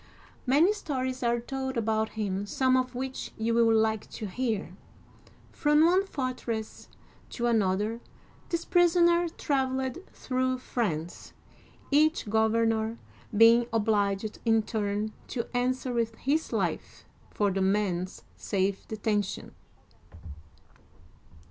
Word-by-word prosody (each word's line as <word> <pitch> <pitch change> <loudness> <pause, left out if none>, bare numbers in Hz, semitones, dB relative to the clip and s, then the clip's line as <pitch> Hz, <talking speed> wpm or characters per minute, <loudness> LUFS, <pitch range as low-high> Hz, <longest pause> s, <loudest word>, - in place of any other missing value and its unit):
Many 310 +10 +5
stories 260 -10 -3
are 240 -1 +1
told 265 +1 -4
about 220 -1 0
him, 200 -1 -2
some 260 +4 +2
of 255 -1 0
which 260 +1 -5
you 225 +1 0
will 230 -1 +4
like 220 -1 +1
to 215 - -6
hear. 220 0 -3 0.8
From 295 +1 +3
one 370 +3 +3
fortress 250 - -4 0.4
to 240 - -3
another 215 0 +1 0.5
this 335 -1 -2
prisoner 345 -1 +4
traveled 265 -1 -1
through 255 0 -1
France, 175 -10 -3 0.6
each 310 -2 +3
governor 220 0 +1 0.4
being 230 +2 +6
obliged 210 -2 0
in 225 -1 +3
turn 210 -1 -2
to 235 -3 -3
answer 255 +1 0
with 230 -1 -1
his 300 +7 -1
life - - -3 0.2
for 205 -1 0
the 195 +1 -1
man's 190 -2 0
safe 195 -1 -2
detention. 210 -2 -2
230 Hz, 110 wpm, -28 LUFS, 215-260 Hz, 0.8 s, being